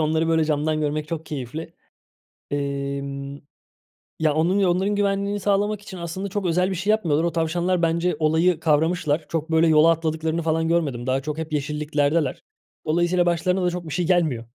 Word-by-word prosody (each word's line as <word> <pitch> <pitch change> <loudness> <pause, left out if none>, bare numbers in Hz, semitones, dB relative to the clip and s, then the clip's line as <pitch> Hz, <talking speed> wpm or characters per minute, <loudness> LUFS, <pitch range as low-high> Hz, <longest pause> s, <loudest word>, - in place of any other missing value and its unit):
onları 160 +1 +1
böyle 160 -1 +3
camdan 155 0 0
görmek 150 0 -2
çok 160 -1 -5
keyifli. 150 +4 -6 0.8
Emm, 140 0 -3 0.8
ya, 155 -2 +2
onun 170 +6 +2
ya 190 -2 +3
onların 190 +4 +1
güvenliğini 200 0 0
sağlamak 205 +1 0
için 195 -2 -9
aslında 175 +3 -4
çok 200 0 -3
özel 180 +2 +2
bir 190 - -2
şey 190 +4 0
yapmıyorlar. 165 -8 +1
O 170 - +1
tavşanlar 170 +2 0
bence 170 +2 +1
olayı 160 +2 +2
kavramışlar, 155 0 +1
çok, 165 -1 -3
böyle, 160 +1 +4
yola 160 +1 +6
atladıklarını 160 0 -1
falan 160 0 0
görmedim. 145 -8 0
Daha 130 +1 +1
çok 150 +2 -4
hep 160 -1 -5
yeşilliklerdeler. 150 0 0 0.4
Dolayısıyla 175 +3 +2
başlarına 180 +2 +1
da - - +3
çok 175 0 -5
bir 155 - -5
şey 175 0 -1
gelmiyor. 160 -10 +1
160 Hz, 175 wpm, -23 LUFS, 150-180 Hz, 0.8 s, yola